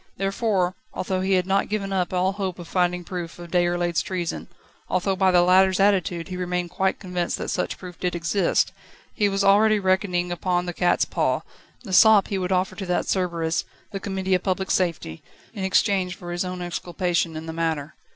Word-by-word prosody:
Therefore, 195 Hz, -2 st, 0 dB, 0.2 s
although 185 Hz, 0 st, -2 dB
he 190 Hz, +1 st, +1 dB
had 180 Hz, -1 st, +2 dB
not 195 Hz, +1 st, +1 dB
given 200 Hz, -2 st, -2 dB
up 180 Hz, -2 st, 0 dB
all 185 Hz, +1 st, +1 dB
hope 195 Hz, -2 st, -4 dB
of 175 Hz, -2 st, -9 dB
finding 180 Hz, 0 st, 0 dB
proofs 175 Hz, -1 st, -6 dB
of 175 Hz, -1 st, -10 dB
Déroulède's 175 Hz, -2 st, +1 dB
treason, 180 Hz, -3 st, -4 dB, 0.4 s
although 190 Hz, +1 st, 0 dB
by 190 Hz, 0 st, +3 dB
the 180 Hz, -1 st, +5 dB
latter's 185 Hz, +1 st, +4 dB
attitude 190 Hz, -3 st, +1 dB
he 180 Hz, -, -5 dB
remained 180 Hz, -1 st, -2 dB
quite 190 Hz, +1 st, 0 dB
convinced 180 Hz, -2 st, -2 dB
that -, -, -4 dB
such -, -, -2 dB
proof 180 Hz, -2 st, -10 dB
did 180 Hz, -1 st, -1 dB
exist, 170 Hz, +2 st, +1 dB, 0.4 s
he 205 Hz, -2 st, +2 dB
was 195 Hz, 0 st, 0 dB
already 210 Hz, +2 st, +5 dB
reckoning 185 Hz, -2 st, 0 dB
upon 175 Hz, 0 st, 0 dB
the 175 Hz, -, -4 dB
cat's 175 Hz, +1 st, +2 dB
paw, -, -, 0 dB, 0.4 s
the 195 Hz, -6 st, -7 dB
sop 215 Hz, 0 st, +6 dB
he 195 Hz, -, -1 dB
would 180 Hz, 0 st, -2 dB
offer 185 Hz, 0 st, +1 dB
to 195 Hz, -3 st, -6 dB
that 180 Hz, -, 0 dB
Cerberus, 170 Hz, -3 st, 0 dB, 0.3 s
the 195 Hz, -, -4 dB
Committee 190 Hz, -1 st, -2 dB
of 180 Hz, -, +3 dB
Public 190 Hz, 0 st, -1 dB
Safety, 165 Hz, -, -1 dB, 0.3 s
in 200 Hz, -4 st, -5 dB
exchange 190 Hz, -1 st, +1 dB
for 175 Hz, -1 st, -8 dB
his 175 Hz, +1 st, -1 dB
own 180 Hz, -1 st, -5 dB
exculpation 175 Hz, -1 st, -1 dB
in 160 Hz, -, -7 dB
the 160 Hz, -, -5 dB
matter. 160 Hz, -3 st, -2 dB
180 Hz, 195 wpm, -24 LUFS, 175-190 Hz, 0.4 s, sop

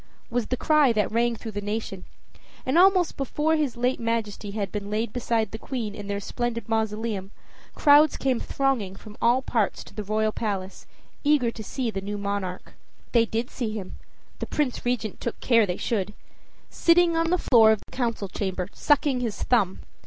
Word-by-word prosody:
was 235 Hz, -2 st, 0 dB
the 255 Hz, -, -1 dB
cry 300 Hz, -3 st, +4 dB
that 215 Hz, -2 st, 0 dB
rang 235 Hz, +1 st, +1 dB
through 225 Hz, 0 st, -7 dB
the 205 Hz, 0 st, -4 dB
nation, 205 Hz, -2 st, -4 dB, 0.6 s
and 260 Hz, -, 0 dB
almost 365 Hz, -1 st, +5 dB
before 295 Hz, +4 st, 0 dB
his 290 Hz, -6 st, -1 dB
late 250 Hz, +2 st, 0 dB
Majesty 225 Hz, -3 st, -2 dB
had 200 Hz, -1 st, -3 dB
been 205 Hz, -1 st, -4 dB
laid 215 Hz, +1 st, -2 dB
beside 230 Hz, -3 st, 0 dB
the 220 Hz, -, -6 dB
Queen 230 Hz, -6 st, -4 dB
in 205 Hz, -1 st, -8 dB
their 200 Hz, 0 st, -2 dB
splendid 230 Hz, +2 st, -3 dB
mausoleum, 220 Hz, -3 st, -1 dB, 0.5 s
crowds 295 Hz, 0 st, +6 dB
came 260 Hz, -3 st, 0 dB
thronging 255 Hz, -9 st, -1 dB
from 210 Hz, +1 st, -12 dB
all 245 Hz, +3 st, +3 dB
parts 220 Hz, -5 st, 0 dB
to -, -, -15 dB
the 210 Hz, +1 st, -5 dB
royal 215 Hz, +1 st, 0 dB
palace, 195 Hz, -4 st, -4 dB, 0.4 s
eager 285 Hz, -5 st, +3 dB
to 225 Hz, -, -8 dB
see 245 Hz, +2 st, -2 dB
the 195 Hz, -2 st, -4 dB
new 205 Hz, +1 st, -4 dB
monarch. 200 Hz, -2 st, -4 dB, 0.4 s
They 230 Hz, -2 st, +4 dB
did 230 Hz, +3 st, -2 dB
see 225 Hz, -4 st, -3 dB
him, 200 Hz, -4 st, -7 dB, 0.4 s
the -, -, -4 dB
Prince 285 Hz, -5 st, -1 dB
Regent 240 Hz, -4 st, -2 dB
took 235 Hz, -, -4 dB
care 230 Hz, -4 st, +4 dB
they 180 Hz, -, -2 dB
should, 210 Hz, -2 st, -2 dB, 0.6 s
sitting 335 Hz, 0 st, +4 dB
on 330 Hz, 0 st, +1 dB
the 360 Hz, -, +3 dB
floor 230 Hz, -9 st, +6 dB
of 220 Hz, -, +1 dB
the -, -, -22 dB
council 230 Hz, -5 st, -1 dB
chamber, 190 Hz, -1 st, -3 dB
sucking 285 Hz, -3 st, +2 dB
his 230 Hz, -4 st, -3 dB
thumb! 200 Hz, -7 st, +1 dB
230 Hz, 185 wpm, -25 LUFS, 205-255 Hz, 0.6 s, crowds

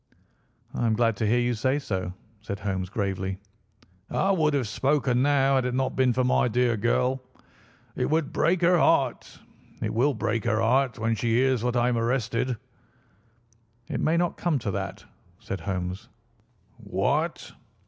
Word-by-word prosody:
"I 120 Hz, -, 0 dB
am 110 Hz, -, +2 dB
glad 115 Hz, -1 st, +2 dB
to 110 Hz, -, 0 dB
hear 115 Hz, +3 st, +3 dB
you 120 Hz, 0 st, +1 dB
say 130 Hz, +5 st, 0 dB
so," 95 Hz, -10 st, -3 dB, 0.3 s
said 100 Hz, -2 st, -5 dB
Holmes 95 Hz, -2 st, -2 dB
gravely. 95 Hz, -2 st, -2 dB, 0.7 s
"I 195 Hz, -, +1 dB
would 155 Hz, -6 st, +2 dB
have 130 Hz, -5 st, 0 dB
spoken 130 Hz, +1 st, +1 dB
now 140 Hz, -1 st, +3 dB
had 130 Hz, -2 st, +2 dB
it 125 Hz, 0 st, -1 dB
not 130 Hz, 0 st, -1 dB
been 130 Hz, -1 st, +3 dB
for 130 Hz, +1 st, +1 dB
my 125 Hz, 0 st, +3 dB
dear 120 Hz, 0 st, +2 dB
girl. 125 Hz, +4 st, +1 dB, 0.7 s
It -, -, -1 dB
would 155 Hz, -1 st, 0 dB
break 170 Hz, +3 st, +2 dB
her 175 Hz, 0 st, +4 dB
heart—it 135 Hz, -7 st, -1 dB
will 130 Hz, +5 st, +2 dB
break 110 Hz, +1 st, -1 dB
her 110 Hz, -2 st, +1 dB
heart 125 Hz, +3 st, +2 dB
when 115 Hz, +1 st, 0 dB
she 115 Hz, +1 st, 0 dB
hears 130 Hz, -1 st, +2 dB
that 125 Hz, +1 st, -1 dB
I 120 Hz, 0 st, +3 dB
am 120 Hz, -2 st, +1 dB
arrested." 120 Hz, 0 st, -1 dB, 1.3 s
"It -, -, -2 dB
may 160 Hz, +2 st, +2 dB
not 175 Hz, 0 st, 0 dB
come 170 Hz, -4 st, 0 dB
to 105 Hz, -3 st, -2 dB
that," 95 Hz, 0 st, -5 dB, 0.3 s
said 95 Hz, -, -6 dB
Holmes. 95 Hz, +3 st, -4 dB, 0.7 s
"What?" 120 Hz, -, -1 dB
120 Hz, 165 wpm, -26 LUFS, 110-135 Hz, 1.3 s, her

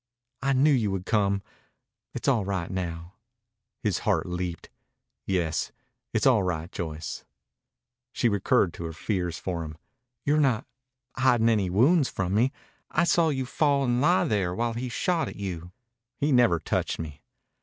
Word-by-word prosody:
"I 135 Hz, 0 st, +2 dB
knew 140 Hz, +4 st, +4 dB
you 115 Hz, -7 st, +2 dB
would 95 Hz, -1 st, -3 dB
come. 100 Hz, -2 st, +1 dB, 0.7 s
It's -, -, -4 dB
all 120 Hz, -6 st, +3 dB
right 95 Hz, -2 st, -3 dB
now." 85 Hz, -1 st, -4 dB, 0.7 s
His -, -, +1 dB
heart -, -, +1 dB
leaped. 90 Hz, -1 st, -4 dB, 0.6 s
"Yes, 85 Hz, -4 st, 0 dB, 0.4 s
it's 110 Hz, -, 0 dB
all 125 Hz, -6 st, +5 dB
right, 85 Hz, -2 st, -2 dB
Joyce." 80 Hz, -3 st, -5 dB, 0.9 s
She 120 Hz, -, +1 dB
recurred 100 Hz, -3 st, +2 dB
to 85 Hz, -, -6 dB
her 80 Hz, -, -5 dB
fears 90 Hz, -1 st, -2 dB
for 85 Hz, -3 st, -3 dB
him. 80 Hz, -1 st, -8 dB, 0.5 s
"You're 150 Hz, +2 st, +3 dB
not... 130 Hz, -5 st, +2 dB, 0.5 s
hiding 125 Hz, -3 st, +4 dB
any 105 Hz, -5 st, +2 dB
wounds 135 Hz, -, +4 dB
from 95 Hz, 0 st, -2 dB
me? 120 Hz, +6 st, +3 dB, 0.4 s
I -, -, +2 dB
saw 170 Hz, -1 st, +3 dB
you 130 Hz, -3 st, -1 dB
fall 140 Hz, +1 st, +2 dB
and 120 Hz, -1 st, +1 dB
lie 175 Hz, +5 st, +4 dB
there 95 Hz, -5 st, 0 dB
while 115 Hz, +2 st, 0 dB
he 125 Hz, +2 st, -3 dB
shot 170 Hz, +7 st, 0 dB
at -, -, -7 dB
you." 90 Hz, -3 st, -5 dB, 0.5 s
"He 145 Hz, +1 st, +1 dB
never 120 Hz, -10 st, +4 dB
touched 80 Hz, -, -1 dB
me." 75 Hz, -3 st, -7 dB
100 Hz, 160 wpm, -27 LUFS, 90-130 Hz, 0.9 s, all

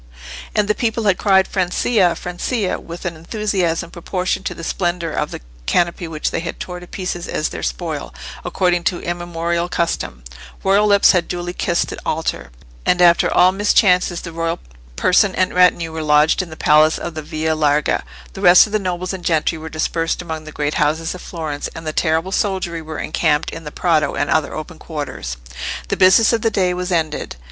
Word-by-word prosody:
And 210 Hz, -1 st, +2 dB
the 210 Hz, -, +3 dB
people 225 Hz, +1 st, -1 dB
had 200 Hz, -3 st, +2 dB
cried 190 Hz, -2 st, +4 dB
Francia, 185 Hz, 0 st, +1 dB
Francia! 185 Hz, +5 st, -2 dB
with 170 Hz, +2 st, -9 dB
an 170 Hz, -1 st, -2 dB
enthusiasm 180 Hz, -1 st, -2 dB
proportioned 185 Hz, +2 st, -2 dB
to -, -, -4 dB
the 165 Hz, -, -9 dB
splendour 175 Hz, -1 st, -1 dB
of 150 Hz, -, -2 dB
the -, -, -7 dB, 0.3 s
canopy 175 Hz, 0 st, +1 dB
which 155 Hz, -2 st, -2 dB
they -, -, -1 dB
had 165 Hz, 0 st, -5 dB
torn 180 Hz, -1 st, -6 dB
to 180 Hz, -, -11 dB
pieces 180 Hz, -2 st, -4 dB
as 155 Hz, -, -1 dB
their -, -, -6 dB
spoil, -, -, -4 dB, 0.3 s
according 180 Hz, -2 st, +1 dB
to 175 Hz, -, +1 dB
immemorial 170 Hz, 0 st, -2 dB
custom; 115 Hz, -, -2 dB, 0.4 s
royal 200 Hz, +2 st, +4 dB
lips 200 Hz, -1 st, +6 dB
had 180 Hz, -2 st, +1 dB
duly 175 Hz, 0 st, -4 dB
kissed 175 Hz, -1 st, 0 dB
the -, -, -6 dB
altar; 155 Hz, -, -2 dB, 0.3 s
and 180 Hz, -, +2 dB
after 175 Hz, -1 st, +5 dB
all 185 Hz, -, +5 dB
mischances 185 Hz, -3 st, +3 dB
the 170 Hz, -, -7 dB
royal 165 Hz, 0 st, -2 dB, 0.4 s
person 185 Hz, -, +3 dB
and 185 Hz, -, +1 dB
retinue 175 Hz, -2 st, +3 dB
were 160 Hz, 0 st, -4 dB
lodged 150 Hz, +3 st, +4 dB
in 180 Hz, -, -7 dB
the 160 Hz, -, -10 dB
Palace 155 Hz, +1 st, +4 dB
of 170 Hz, -, -5 dB
the 155 Hz, -, -5 dB
Via 155 Hz, +1 st, -2 dB
Larga, 150 Hz, -1 st, +1 dB, 0.3 s
the 195 Hz, -, -8 dB
rest 180 Hz, -2 st, +8 dB
of 215 Hz, -, -9 dB
the 215 Hz, -, +2 dB
nobles 185 Hz, -1 st, -3 dB
and 185 Hz, -2 st, -7 dB
gentry 160 Hz, -1 st, +1 dB
were 160 Hz, +1 st, -7 dB
dispersed 165 Hz, +1 st, -1 dB
among 160 Hz, -3 st, -5 dB
the 155 Hz, -, -8 dB
great 150 Hz, 0 st, -2 dB
houses 160 Hz, +2 st, +1 dB
of 180 Hz, -, -9 dB
Florence, 155 Hz, -4 st, -5 dB
and 165 Hz, -, -8 dB
the 155 Hz, -, -3 dB
terrible 160 Hz, +3 st, 0 dB
soldiery 190 Hz, -5 st, -1 dB
were 155 Hz, -1 st, -7 dB
encamped 150 Hz, 0 st, 0 dB
in 165 Hz, 0 st, -8 dB
the 150 Hz, -, -6 dB
Prato 165 Hz, -3 st, +1 dB
and 145 Hz, -, -1 dB
other 155 Hz, -2 st, +1 dB
open 155 Hz, +2 st, -7 dB
quarters. 145 Hz, -, -5 dB, 0.5 s
The -, -, +1 dB
business 190 Hz, +5 st, +5 dB
of 230 Hz, -, +1 dB
the 225 Hz, -, +2 dB
day 185 Hz, -4 st, +1 dB
was 180 Hz, +1 st, -3 dB
ended. 160 Hz, -3 st, -1 dB
175 Hz, 195 wpm, -19 LUFS, 160-185 Hz, 0.5 s, rest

